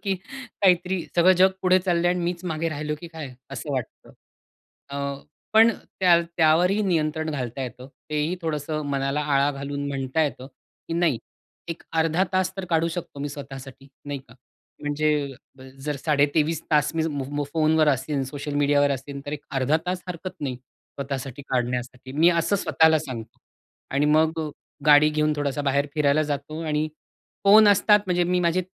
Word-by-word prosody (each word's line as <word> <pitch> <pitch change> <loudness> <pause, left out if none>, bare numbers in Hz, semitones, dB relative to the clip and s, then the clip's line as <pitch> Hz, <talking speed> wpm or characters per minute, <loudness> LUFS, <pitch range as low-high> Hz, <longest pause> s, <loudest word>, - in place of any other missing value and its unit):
की 195 -2 0 0.5
काहीतरी 180 -1 +3
"सगळं 175 +2 +6
जग 190 +1 +6
पुढे 185 0 +5
चाललंय 175 -1 +1
आणि 180 - 0
मीच 175 +1 -3
मागे 165 -1 -1
राहिलो 150 -1 -3
की 170 - -8
काय?" 155 -6 -8 0.2
असं 140 +2 -5
वाटतं. 130 -4 -5 0.8
अ, 140 - -4 0.6
पण 225 +1 +8 0.3
त्या 175 -2 +6 0.2
त्यावरही 175 +6 +4
नियंत्रण 160 -4 0
घालता 130 -3 -4
येतं. 125 0 -7 0.2
तेही, 150 +4 0
थोडसं 155 -1 -2
मनाला 140 +1 0
आळा 140 -1 +2
घालून 140 +1 -4
म्हणता 135 +2 -1
येतं, 135 -4 -3 0.4
की - - -3
नाही, 165 -8 +2 0.5
एक 165 - -5
अर्धा 165 +3 +2
तास 185 0 +1
तर 195 - -4
काढू 165 0 +2
शकतो 165 -3 -6
मी 145 - -2
स्वतःसाठी, 135 -1 -9 0.2
नाही 145 -1 -4
का? 125 -2 -19 0.5
म्हणजे 145 -1 0 0.5
जर 150 -1 -2
साडे 145 0 +2
23 160 0 +1
तास 150 0 +2
मी 160 0 +1
मो 145 0 -3
फोनवर 155 -1 +3
असेन, 135 +1 0
सोशल 145 +2 -6
मीडियावर 145 0 +3
असेन, 140 +1 -4
तर 145 - -4
एक 150 -1 -5
अर्धा 135 +3 +2
तास 180 0 -2
हरकत 180 +1 -6
नाही, 130 -4 -3
स्वतःसाठी 135 +1 -8
काढण्यासाठी. 125 0 -2
मी 160 +5 +4
असं 170 +4 +1
स्वतःला 160 -4 +4
सांगतो. 130 -7 -8 0.5
आणि 140 +2 +1
मग 160 +1 +2 0.5
गाडी 150 0 +7
घेऊन 150 0 +1
थोडासा 145 0 -1
बाहेर 140 +1 +1
फिरायला 150 0 +3
जातो 145 +3 -5
आणि 155 0 0 0.6
फोन 210 +1 +8
असतात 205 +1 +5
म्हणजे 180 -1 +2
मी 180 +1 +1
माझे 175 +1 +1
150 Hz, 165 wpm, -24 LUFS, 140-170 Hz, 0.8 s, पण